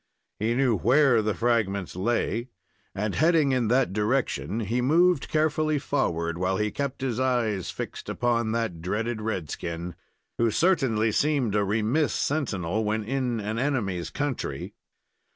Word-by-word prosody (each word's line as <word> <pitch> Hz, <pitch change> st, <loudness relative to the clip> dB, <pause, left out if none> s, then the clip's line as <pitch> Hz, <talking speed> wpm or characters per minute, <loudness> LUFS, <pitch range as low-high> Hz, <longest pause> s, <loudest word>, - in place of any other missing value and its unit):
He 115 Hz, +3 st, 0 dB
knew 130 Hz, -3 st, +3 dB
where 125 Hz, -, +4 dB
the 105 Hz, -1 st, -1 dB
fragments 105 Hz, -7 st, 0 dB
lay, 115 Hz, +4 st, -1 dB, 0.5 s
and, 105 Hz, +1 st, -1 dB
heading 160 Hz, -3 st, +3 dB
in 125 Hz, -3 st, +1 dB
that 125 Hz, -3 st, +2 dB
direction, 105 Hz, -, 0 dB
he 115 Hz, +4 st, -1 dB
moved 165 Hz, +4 st, +3 dB
carefully 155 Hz, 0 st, +1 dB
forward, 85 Hz, -, -1 dB
while 95 Hz, +1 st, 0 dB
he 105 Hz, +1 st, 0 dB
kept 140 Hz, +1 st, -3 dB
his 125 Hz, -3 st, -1 dB
eyes 120 Hz, -7 st, 0 dB
fixed -, -, -6 dB
upon 115 Hz, -1 st, 0 dB
that 115 Hz, -8 st, -2 dB
dreaded 110 Hz, +5 st, -2 dB
red 95 Hz, -8 st, -3 dB
skin, 85 Hz, +1 st, -5 dB, 0.5 s
who 115 Hz, 0 st, +3 dB
certainly 125 Hz, -, +2 dB
seemed 140 Hz, -3 st, +1 dB
a 105 Hz, -1 st, +2 dB
remiss 110 Hz, +9 st, +1 dB
sentinel 110 Hz, -, -1 dB
when 110 Hz, +1 st, -1 dB
in 125 Hz, 0 st, -1 dB
an 110 Hz, +2 st, -3 dB
enemy's 105 Hz, -11 st, -1 dB
country. 145 Hz, -4 st, -3 dB
115 Hz, 145 wpm, -26 LUFS, 105-135 Hz, 0.5 s, where